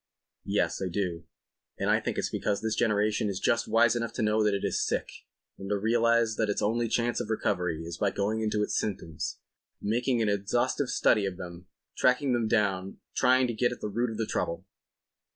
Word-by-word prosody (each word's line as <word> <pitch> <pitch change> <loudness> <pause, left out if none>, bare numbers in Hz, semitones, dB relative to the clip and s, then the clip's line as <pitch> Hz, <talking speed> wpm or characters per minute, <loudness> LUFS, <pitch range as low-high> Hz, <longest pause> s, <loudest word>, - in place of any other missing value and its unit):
"Yes, - - 0
I 95 - -1
do. 90 -3 -3 0.5
And - - -2
I - - +4
think - - -3
it's - - -1
because 100 - -1
this 110 -1 0
generation 105 -1 +1
is 95 -1 -3
just 115 - +1
wise 115 +1 +4
enough 115 -1 -2
to 115 - -2
know 105 0 +2
that 105 -1 +2
it 100 - -3
is - - 0
sick - - -1 0.5
and 95 0 -6
to 105 - +1
realize 115 +1 +2
that 110 -2 +1
its 105 - 0
only 115 +3 +1
chance 120 +1 0
of - - -4
recovery 90 -7 -1
is 85 +1 -7
by 100 - +2
going 105 +3 -1
into 105 -1 0
its - - -2
symptoms—making 110 - -3
an 110 - +1
exhaustive 120 +7 0
study 105 -3 +3
of 90 -2 -5
them—tracking 110 +10 -1
them 120 -2 +1
down—trying 105 +5 +1
to 120 - -2
get 120 +2 +1
at 125 - -6
the 105 - -4
root 120 +4 0
of 110 - -6
the 110 - 0
trouble." 95 -2 -2
110 Hz, 195 wpm, -28 LUFS, 100-115 Hz, 0.5 s, I